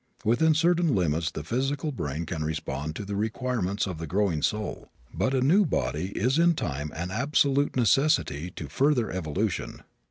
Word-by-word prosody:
Within 150 +9 +3
certain 170 -3 +3
limits 80 -3 +1
the 75 - -6
physical 135 - -1
brain 80 - -4
can 80 -2 -3
respond 75 -1 -3
to 100 - -5
the 100 +1 -4
requirements 110 -2 -1
of 90 -5 -5
the 80 - -5
growing 90 -3 0
soul, 105 +5 -2 0.2
but 130 - 0
a 130 - +2
new 175 +11 +5
body 90 - -1
is 130 +8 +2
in 170 0 +4
time 75 - -3
an 85 +3 -4
absolute 140 +4 +2
necessity 125 - +2
to 75 - -6
further 125 - +1
evolution. 95 +2 -3
105 Hz, 165 wpm, -27 LUFS, -, 0.2 s, new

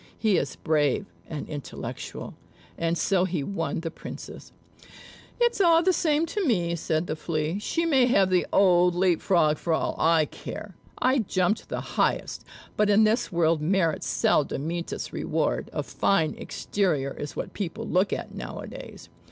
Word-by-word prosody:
He 215 -4 +2
is 140 - -2
brave 150 +4 +1 0.2
and 155 -3 -5
intellectual." 145 -2 -6 0.4
And 165 0 -1
so 190 0 +2
he 170 -6 -2
won 165 -2 -2
the 165 -1 -4
Princess. - - -9 0.9
"It's 475 -3 +2
all 335 -2 +5
the 370 +1 +3
same 315 -2 +2
to 405 +5 -2
me," 175 - +1
said 160 0 -1
the 155 - -3
Flea. 155 +3 -2
"She 335 +10 -1
may 270 -6 +4
have 195 -7 +3
the 180 -1 +2
old 180 -2 +4
Leap 175 -2 +2
frog, 155 -5 +3
for 170 - -1
all - - 0
I 160 -1 +4
care. 205 +6 -8 0.2
I 260 +2 +2
jumped 185 -1 0
the - - -3
highest; - - -1 0.3
but 210 0 +2
in 205 +1 +5
this 220 +3 +2
world 165 -2 +2
merit 165 -1 +1
seldom 145 -1 +1
meets 170 +1 -3
its - - -5
reward. - - -1
A - - -2
fine 165 -6 +1
exterior 155 -9 -1
is 145 - -6
what - - -5
people 185 -5 -4
look 185 +3 +2
at - - -4
now - - -6
a - - -6
days." - - -10
180 Hz, 170 wpm, -26 LUFS, 160-210 Hz, 0.9 s, all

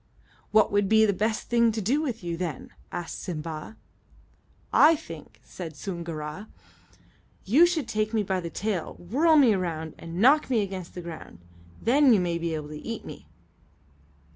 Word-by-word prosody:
"What 215 0 +4
would 205 -1 +2
be 220 0 +6
the 205 - +2
best 215 +3 -1
thing 235 -1 +3
to 220 - -2
do 245 +9 +1
with 245 - -4
you, 170 -1 -3
then?" 165 -5 -5 0.2
asked 175 -1 -5
Simba. 160 +3 -6 1.0
"I 320 +2 +7
think," 155 - -11
said 165 -4 -8
Soongoora, 170 +1 -6 1.0
"you 290 - +6
should 320 -8 -1
take 215 -1 -1
me 220 -2 +1
by 190 -1 -1
the 170 -2 -5
tail, 200 -1 -3
whirl 300 - +2
me 265 -7 +6
around, 160 -4 -3
and 165 +1 -7
knock 275 +8 +5
me 235 -4 +2
against 190 -3 -7
the 180 - -5
ground. 165 - -9 0.4
Then 265 +3 +4
you 210 - +4
may 170 -2 -1
be 165 -1 -2
able 150 -1 -6
to 150 0 -8
eat 230 -1 -5
me." - - -10
195 Hz, 170 wpm, -26 LUFS, 170-230 Hz, 1.0 s, I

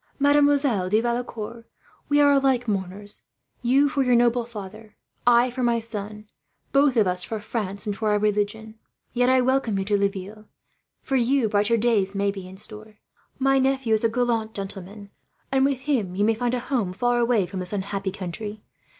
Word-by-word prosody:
Mademoiselle 285 -8 +3
de 215 +3 +3
Valecourt, 235 -1 -4 0.5
we 290 0 +3
are 285 -1 +6
alike 265 -3 +2
mourners 200 0 -3 0.4
you 270 +4 +3
for 280 0 0
your 250 -2 +3
noble 240 0 +3
father, 215 -1 -10 0.3
I 240 +1 +5
for 255 +1 -5
my 240 -1 +2
son, 210 -2 -6 0.4
both 275 -2 +3
of 215 - +5
us 180 -1 0
for 220 - -4
France 205 -2 -4
and 205 -1 -2
for 215 +1 -1
our 210 - +3
religion. 215 +1 -1 0.3
Yet 245 0 +2
I 260 0 +4
welcome 250 -5 +1
you 195 - -2
to 205 0 +1
Laville. 200 +2 -3 0.6
For 270 - 0
you, 250 0 +2
brighter 210 +2 +2
days 210 -4 +1
may 200 0 +1
be 195 -2 -8
in 190 +1 -12
store. 215 +1 -10 0.4
My 270 0 +3
nephew 265 -3 +1
is 220 - +1
a 230 - +3
gallant 230 -2 -1
gentleman, 200 +1 -7 0.4
and 265 0 +3
with 275 -2 0
him 245 -11 -1
you 205 +2 +2
may 225 - +3
find 245 +2 -1
a - - -1
home 240 -8 -1
far 245 +5 +1
away 235 -5 +2
from 185 +2 -6
this 180 -1 -3
unhappy 195 -1 -3
country. 205 +3 -6
220 Hz, 185 wpm, -24 LUFS, 205-250 Hz, 0.6 s, are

